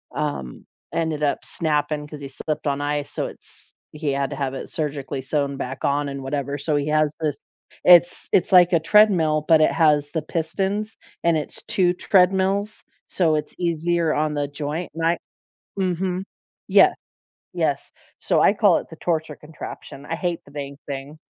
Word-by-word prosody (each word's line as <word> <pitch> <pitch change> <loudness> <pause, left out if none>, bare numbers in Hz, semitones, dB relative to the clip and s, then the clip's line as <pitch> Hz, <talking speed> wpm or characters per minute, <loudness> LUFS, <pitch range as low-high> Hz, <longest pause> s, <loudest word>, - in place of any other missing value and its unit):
um, 145 - -4 0.3
ended 160 -2 -1
up 145 - 0
snapping, 150 -2 -1
'cause 150 -1 -10
he 140 - -7
slipped 150 +3 -4
on 140 0 0
ice, 145 0 -2
so - - -2
it's - - -15 0.2
he 150 -1 -2
had 140 0 -1
to 140 - -5
have 135 -1 -2
it 135 - -6
surgically 140 -3 -3
sewn 140 0 -1
back 130 0 -5
on 145 +1 +1
and 140 0 -6
whatever, 140 +1 -3
so 150 +1 -1
he 145 0 0
has 155 -1 +2
this 150 -3 -1 0.5
it's 175 -1 +5
it's 185 - +2
like 180 0 +7
a 170 - +5
treadmill, 165 -5 +4
but 160 -2 +6
it 155 - +4
has 150 -3 +3
the 160 - -1
pistons, 195 +7 -2 0.3
and 170 -1 +3
it's 150 - -6
2 180 -2 +2
treadmills, 190 +3 +2 0.3
so 165 -4 +1
it's 150 -1 -3
easier 170 -1 0
on 150 0 0
the 145 -1 -1
joint, 150 +4 -4
and 165 0 -2
I 170 +1 +2 0.6
Mhm. 185 0 -1 0.4
Yeah. - - +6 0.6
Yes, - - -1 0.3
so - - +1
I - - +5
call 205 -4 +4
it - - -9
the 160 - -10
torture 160 -3 -2
contraption. 150 -2 -10
I 165 - -3
hate 175 -1 -3
the - - -17
dang 140 -1 -6
thing, 140 +2 -6
155 Hz, 175 wpm, -23 LUFS, 145-170 Hz, 0.6 s, like